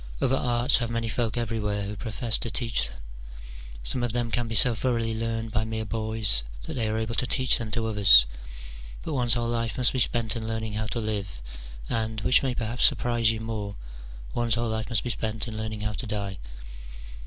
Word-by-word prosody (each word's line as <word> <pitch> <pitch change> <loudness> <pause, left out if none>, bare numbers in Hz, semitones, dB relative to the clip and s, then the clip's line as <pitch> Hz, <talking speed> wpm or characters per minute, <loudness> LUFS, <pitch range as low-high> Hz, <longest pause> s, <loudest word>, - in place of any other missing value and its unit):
Other 130 - +2
arts 120 +1 +3
have 120 -2 -2
many 115 0 -2
folk 115 0 -2
everywhere 105 -3 -2
who 105 +1 -6
profess 110 +2 -3
to 115 - -2
teach 115 - 0
them: - - -11 0.9
some 120 - +3
of 120 -2 -1
them 120 -1 -1
can 120 0 -1
be 115 - -4
so 120 +3 +9
thoroughly 115 0 -1
learned 115 0 -3
by 110 +1 0
mere 110 0 -4
boys, 110 - +3 0.2
that - - -6
they 115 -4 -1
are 110 - -1
able 110 0 -3
to 125 - 0
teach 130 -1 +3
them 115 -2 -5
to 115 +1 -2
others: 100 - +7 0.8
but 160 - -4
one's 125 -3 +2
whole 120 -1 -1
life 115 +1 -2
must 125 -2 +4
be 130 - -1
spent 120 -1 0
in 110 -1 -5
learning 110 -1 -3
how 110 +1 -3
to 115 - -3
live, 105 - -4 0.5
and, 110 -1 -2
which 130 - +4
may 130 -3 -2
perhaps 115 +2 -2
surprise 120 -2 +2
you 110 0 -5
more, 105 -3 -5 0.6
one's 120 -2 +1
whole 120 -1 -1
life 110 +1 -3
must 115 -3 0
be 120 - -2
spent 110 +2 -3
in 110 - -6
learning 110 -1 -5
how 105 0 -2
to 115 - -5
die. 100 -3 -4
115 Hz, 210 wpm, -26 LUFS, 110-120 Hz, 0.9 s, so